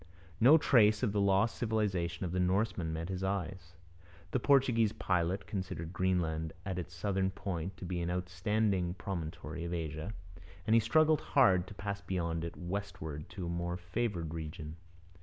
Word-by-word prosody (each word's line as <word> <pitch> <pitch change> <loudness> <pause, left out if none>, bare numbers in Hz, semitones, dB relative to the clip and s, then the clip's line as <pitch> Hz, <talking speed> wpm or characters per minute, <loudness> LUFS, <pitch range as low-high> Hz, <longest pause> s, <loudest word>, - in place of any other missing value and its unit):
No 135 +8 +8
trace 110 -7 +4
of 115 - +2
the 100 0 +1
lost 100 +3 +3
civilization 100 -6 0
of 85 - -3
the 90 - -1
Norsemen 95 -2 +1
met 80 +2 -4
his 95 0 -3
eyes. 95 -2 -3 0.6
The - - +1
Portuguese 120 -5 +4
pilot 90 +2 0
considered 95 -4 -4
Greenland 85 -4 0
at 95 -2 -2
its 90 0 -7
southern 95 +1 0
point 95 -1 -4
to - - -7
be 90 0 -2
an 85 - -1
outstanding 90 +1 0
promontory 85 -3 -5
of 85 +1 -2
Asia, 80 +3 -4 0.5
and 110 - +2
he 115 - +7
struggled 155 +7 +4
hard 95 -10 +4
to 105 - -10
pass 100 0 -4
beyond 85 -4 -2
it 85 - -5
westward 85 -5 -5
to 95 - -6
a - - -3
more 85 +1 -2
favoured 90 -3 -2
region. 80 -1 -6
90 Hz, 165 wpm, -33 LUFS, 85-105 Hz, 0.6 s, No